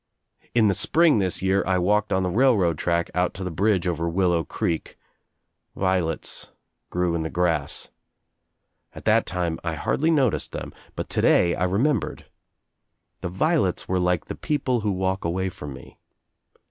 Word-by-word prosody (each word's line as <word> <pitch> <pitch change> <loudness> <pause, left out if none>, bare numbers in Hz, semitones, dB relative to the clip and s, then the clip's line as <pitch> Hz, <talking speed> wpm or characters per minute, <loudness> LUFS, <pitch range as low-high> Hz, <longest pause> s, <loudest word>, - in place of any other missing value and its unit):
In 115 -3 +5
the 100 - +3
spring 160 - +4
this 95 -1 -1
year 95 +1 +2
I 95 -1 +2
walked 105 +4 +1
on 95 0 +2
the 90 - 0
railroad 100 - +3
track 85 -1 0
out 90 0 0
to 95 - -5
the 90 - -3
bridge 95 +2 +1
over 85 -1 -1
Willow 85 -1 +1
Creek. 80 +1 -3 0.8
Violets 95 -4 -1 0.4
grew 90 -1 0
in 85 - -1
the 80 - -3
grass. 85 -1 -1 1.1
At - - -10
that - - +3
time 85 -2 -2
I 85 -2 -2
hardly 155 - 0
noticed 135 - +1
them - - -6 0.2
but - - -4
today 85 -1 +3
I 90 - 0
remembered. 115 +7 0 0.9
The 90 - -4
violets 95 - 0
were 95 0 0
like 90 -1 +1
the - - -5
people 130 -5 -1
who 105 -1 -1
walk 95 0 -1
away 95 +3 -1
from 75 -5 -8
me. 65 - -13
95 Hz, 160 wpm, -24 LUFS, 85-105 Hz, 1.1 s, In